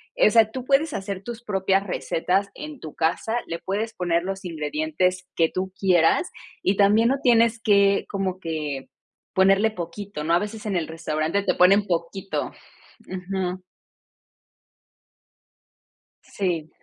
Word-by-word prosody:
o - - +5
sea, 225 -2 +4
tú 255 +2 -5
puedes 285 +3 +2
hacer 195 0 -4
tus 235 +1 -7
propias 195 -2 +1
recetas 190 +1 -1
en 300 -2 -8
tu 155 - -9
casa, 170 +8 0
le 170 - -4
puedes 215 +4 -3
poner 170 -1 0
los 195 +1 -5
ingredientes 160 +3 -1
que 165 -1 +3
tú 185 0 -4
quieras 180 -4 +3 0.3
y 195 +1 +1
también 210 +3 +5
no 270 +1 +1
tienes 230 -2 +4
que 200 -3 +4
como 190 -2 -2
que 150 -6 -4 0.5
ponerle 195 +3 +4
poquito, 180 -2 -6
¿no? 165 - +1
A 170 - +5
veces 210 +2 -6
en 205 -3 -1
el 170 -3 -1
restaurante 160 +3 -1
te - - +1
ponen 195 +3 +5
poquito. 180 +3 -2 0.6
Ujú. 185 0 -3 2.6
Sí. 170 -6 -3
190 Hz, 140 wpm, -24 LUFS, 170-210 Hz, 2.6 s, o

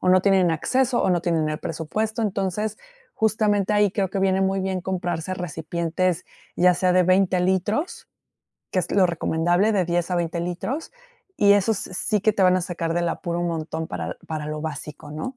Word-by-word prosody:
O 185 - 0
no 185 0 +5
tienen 190 -3 +4
acceso 250 - +1
o - - +2
no 175 -1 +2
tienen 165 -3 0
el 155 - -3
presupuesto. 215 +8 -3
Entonces, 205 +1 -2 0.4
justamente 210 -2 +1
ahí 205 -2 +4
creo 195 -1 -1
que 195 - -2
viene 190 0 +2
muy 190 0 +1
bien 190 -1 -2
comprarse 175 -1 -3
recipientes, 170 +1 -2 0.3
ya 180 0 +5
sea 180 +1 +2
de 185 - +5
20 185 +1 +3
litros, 210 - -1 0.6
que 185 - 0
es - - -5
lo 195 -2 +5
recomendable, 175 +4 +1
de 190 -3 +2
10 175 +1 -1
a - - +1
20 170 0 -1
litros. 205 - -4 0.4
Y 200 -1 +6
esos 205 +2 +2
sí 200 +3 -2
que 215 +1 +3
te 195 - 0
van 185 0 +5
a - - +1
sacar 170 -2 -3
del 175 0 +1
apuro 170 0 -3
un 175 - 0
montón 160 0 -3
para 85 -1 -4
para 155 -1 -4
lo 150 0 -4
básico, 150 -1 -7
¿no? 155 - -5
185 Hz, 195 wpm, -23 LUFS, 170-200 Hz, 0.6 s, Y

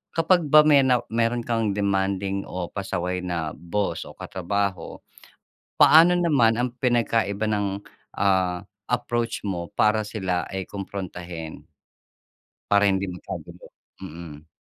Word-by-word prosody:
kapag 170 +2 +3
ba 150 +1 +8
may 145 -2 +6
na 125 -2 +3
meron 115 +1 0
kang 115 -2 0
demanding 100 -1 0
o 90 -1 -4
pasaway 90 -2 -3
na 85 -4 -3
boss 100 +4 -3
o - - -13
katrabaho, 100 +1 -3 0.8
paano 170 +3 +7
naman 140 -10 +3
ang 125 0 -1
pinagkaiba 115 -4 +1
ng, 105 -1 0 0.5
ah, 95 -3 +1 0.2
approach 120 -2 -2
mo 90 -4 -3
para 110 0 +3
sila 95 -5 -2
ay 95 -1 -4
komprontahin? 90 -5 -7 1.0
Para 100 0 +5
hindi 95 0 +1
magkagulo, 90 0 -9 0.3
mm. 80 -1 -10
100 Hz, 120 wpm, -24 LUFS, 90-115 Hz, 1.0 s, ba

